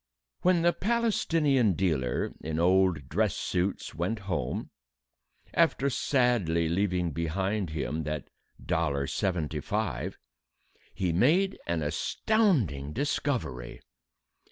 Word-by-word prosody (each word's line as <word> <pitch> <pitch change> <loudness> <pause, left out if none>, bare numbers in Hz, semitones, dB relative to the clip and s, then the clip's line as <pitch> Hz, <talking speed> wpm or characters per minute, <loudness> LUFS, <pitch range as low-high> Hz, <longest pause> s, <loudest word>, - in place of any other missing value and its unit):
When 180 -2 +3
the 175 0 +4
Palestinian 165 - +2
dealer 75 -9 0
in 80 0 -3
old 90 -4 +3
dress - - +1
suits 90 +2 -2
went 95 +7 -2
home 95 -3 -2 0.8
after 140 +2 +2
sadly 120 - +2
leaving 90 -1 0
behind 95 +5 -1
him 75 0 -2
that 75 -1 -3 0.4
dollar 70 -4 0
seventy 80 -1 -1
five - - -2 0.8
he 90 -3 0
made 165 - +3
an 85 -2 0
astonishing 90 - +1
discovery. 115 - -2
90 Hz, 100 wpm, -29 LUFS, 80-130 Hz, 0.8 s, the